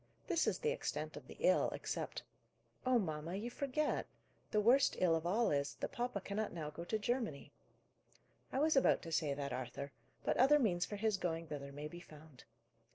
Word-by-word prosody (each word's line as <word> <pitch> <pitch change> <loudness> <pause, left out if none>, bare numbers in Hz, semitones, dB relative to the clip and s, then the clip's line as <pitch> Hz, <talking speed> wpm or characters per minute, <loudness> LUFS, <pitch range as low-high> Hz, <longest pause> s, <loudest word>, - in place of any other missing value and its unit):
This 335 -4 +1
is - - +2
the 460 -1 0
extent - - -3
of - - -9
the - - -11
ill, - - +4
except - - -4 0.3
" - - -36
"Oh, 255 -1 +5
mamma, 165 -3 -2
you 225 +5 -3
forget! 280 +3 0 0.4
The 210 - +2
worst 245 +6 +5
ill 170 -3 +4
of 165 +1 -1
all 225 +6 +2
is, 140 -1 0
that - - -4
papa 240 -4 -2
cannot 205 +3 -2
now 155 -3 -4
go 170 - -6
to 220 - -1
Germany." 215 - -2 1.0
"I - - -2
was 310 +2 +3
about 270 - +4
to 165 - -6
say 150 -3 +1
that, 140 -2 -3
Arthur. 130 +2 -4 0.3
But - - +1
other 275 +4 +7
means 180 -10 +2
for 210 - -4
his 210 0 +1
going 165 -3 -2
thither 145 -3 -6
may 145 +2 -5
be 175 +3 -9
found. 155 -5 -14
185 Hz, 200 wpm, -37 LUFS, 150-245 Hz, 1.0 s, other